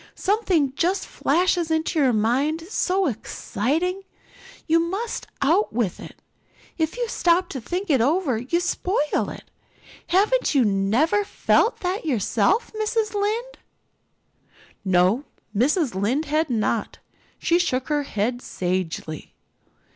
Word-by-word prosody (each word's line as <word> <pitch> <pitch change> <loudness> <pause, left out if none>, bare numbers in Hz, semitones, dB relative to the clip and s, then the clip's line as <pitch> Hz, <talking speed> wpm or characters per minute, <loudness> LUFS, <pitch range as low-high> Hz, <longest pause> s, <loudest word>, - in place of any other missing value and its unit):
"Something 370 - +1
just 360 +7 0
flashes 345 +2 +1
into 320 +1 0
your 265 -3 +4
mind, 260 +9 +1
so 380 -2 +1
exciting, 290 - -2
and 390 - -14 0.6
you 330 0 +3
must 390 +8 -3 0.2
out 335 +9 +3
with 220 -6 -1
it. - - -12 0.5
If 320 +5 -1
you 485 -1 -1
stop 355 -4 +2
to 265 - -5
think 360 - -3
it 265 -5 +4
over 280 -2 +1
you 265 +9 0
spoil 365 +2 -1
it - - 0
all. - - -1 0.7
Haven't 415 +1 +2
you 260 -4 +5
never 220 - +2
felt 440 +3 +1
that 365 +2 -2
yourself, 280 - +1
Mrs. 435 0 -1
Lynde?" 435 +5 -2 1.2
No, 190 +7 +2 0.3
Mrs. 280 - +2
Lynde 225 +11 0
had 310 +1 0
not. 225 -1 -1 0.4
She 340 +1 +2
shook 260 -7 0
her 295 -1 +1
head 245 -1 -2
sagely. 175 - -4
315 Hz, 130 wpm, -23 LUFS, 240-370 Hz, 1.2 s, you